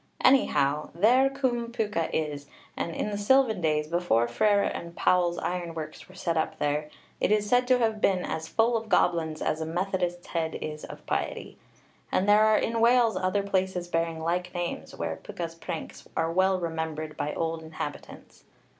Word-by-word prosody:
Anyhow, 150 Hz, -, +3 dB
there 250 Hz, +9 st, +5 dB
Cwm 255 Hz, -4 st, -1 dB
Pwca 210 Hz, -8 st, -1 dB
is, 145 Hz, -2 st, -2 dB, 0.3 s
and 165 Hz, -, -3 dB
in 210 Hz, -, -2 dB
the 205 Hz, -, -3 dB
sylvan 230 Hz, -2 st, +3 dB
days, 155 Hz, -2 st, +1 dB
before 165 Hz, -9 st, +2 dB
Frere 200 Hz, -, +3 dB
and 170 Hz, 0 st, -4 dB
Powell's 175 Hz, -1 st, +2 dB
ironworks 165 Hz, -3 st, -5 dB
were 185 Hz, -, -15 dB
set 170 Hz, -2 st, -1 dB
up 160 Hz, -, -1 dB
there, 150 Hz, +1 st, -1 dB, 0.3 s
it -, -, +1 dB
is 210 Hz, -1 st, +2 dB
said 245 Hz, +3 st, +3 dB
to 255 Hz, 0 st, +5 dB
have 220 Hz, -3 st, 0 dB
been 185 Hz, -2 st, +2 dB
as 160 Hz, 0 st, -4 dB
full 230 Hz, +5 st, +2 dB
of 225 Hz, -1 st, -3 dB
goblins 160 Hz, -2 st, +1 dB
as 155 Hz, -, -1 dB
a -, -, -1 dB
Methodist's 175 Hz, 0 st, -2 dB
head 165 Hz, -2 st, -2 dB
is 150 Hz, 0 st, -6 dB
of -, -, -10 dB
piety. -, -, -3 dB, 0.5 s
And 190 Hz, -, +1 dB
there 210 Hz, +1 st, +6 dB
are 215 Hz, 0 st, +5 dB
in 230 Hz, 0 st, 0 dB
Wales 235 Hz, -2 st, +4 dB
other 185 Hz, +2 st, 0 dB
places 190 Hz, -2 st, -1 dB
bearing 165 Hz, -1 st, -1 dB
like 180 Hz, +2 st, -1 dB
names, 170 Hz, -, -4 dB
where 80 Hz, -1 st, -4 dB
Pwca's 170 Hz, -1 st, -5 dB
pranks 165 Hz, -1 st, -7 dB
are 165 Hz, 0 st, +1 dB
well 185 Hz, +2 st, +2 dB
remembered 160 Hz, -2 st, -4 dB
by 145 Hz, +1 st, -3 dB
old 165 Hz, 0 st, -2 dB
inhabitants. 160 Hz, -2 st, -8 dB
175 Hz, 175 wpm, -27 LUFS, 160-210 Hz, 0.5 s, there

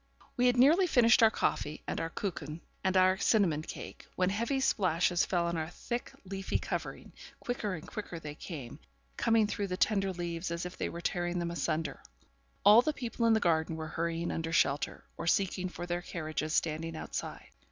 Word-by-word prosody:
We 250 Hz, 0 st, +3 dB
had 245 Hz, 0 st, +3 dB
nearly 320 Hz, +9 st, +6 dB
finished 235 Hz, -7 st, +5 dB
our 225 Hz, -, +8 dB
coffee, 155 Hz, -7 st, -1 dB
and -, -, -2 dB
our 165 Hz, -, -2 dB
'kucken,' 165 Hz, -4 st, -5 dB, 0.2 s
and 190 Hz, 0 st, +2 dB
our 185 Hz, 0 st, +5 dB
cinnamon 190 Hz, -10 st, +3 dB
cake, -, -, -9 dB
when 185 Hz, 0 st, +2 dB
heavy 235 Hz, +7 st, 0 dB
splashes 180 Hz, -7 st, +2 dB
fell 175 Hz, -2 st, +1 dB
on 170 Hz, 0 st, -1 dB
our 160 Hz, 0 st, -2 dB
thick 240 Hz, +7 st, -5 dB
leafy 195 Hz, 0 st, -2 dB
covering; -, -, -5 dB, 0.3 s
quicker 215 Hz, -6 st, -2 dB
and 160 Hz, -, -9 dB
quicker 190 Hz, -5 st, -6 dB
they 150 Hz, -2 st, -7 dB
came, 145 Hz, -6 st, -8 dB, 0.4 s
coming 225 Hz, -2 st, +3 dB
through 205 Hz, -1 st, -2 dB
the 180 Hz, -1 st, -3 dB
tender 195 Hz, -2 st, +2 dB
leaves 170 Hz, -1 st, -4 dB
as 170 Hz, +1 st, -3 dB
if 180 Hz, -, -6 dB
they -, -, -2 dB
were 170 Hz, -, -7 dB
tearing 175 Hz, 0 st, -1 dB
them 170 Hz, -1 st, -1 dB
asunder; 165 Hz, -2 st, -2 dB, 0.6 s
all 210 Hz, +3 st, +9 dB
the 305 Hz, +4 st, 0 dB
people 235 Hz, -3 st, -1 dB
in 225 Hz, -, +5 dB
the 220 Hz, -, +4 dB
garden 160 Hz, -3 st, +1 dB
were 160 Hz, 0 st, -5 dB
hurrying 170 Hz, +1 st, -2 dB
under 165 Hz, 0 st, -3 dB
shelter, 145 Hz, -4 st, +1 dB
or -, -, -4 dB
seeking 185 Hz, 0 st, +1 dB
for 175 Hz, -, -6 dB
their 175 Hz, 0 st, -2 dB
carriages 155 Hz, -2 st, -3 dB
standing 165 Hz, +1 st, 0 dB
outside. -, -, -6 dB
175 Hz, 190 wpm, -31 LUFS, 165-210 Hz, 0.6 s, all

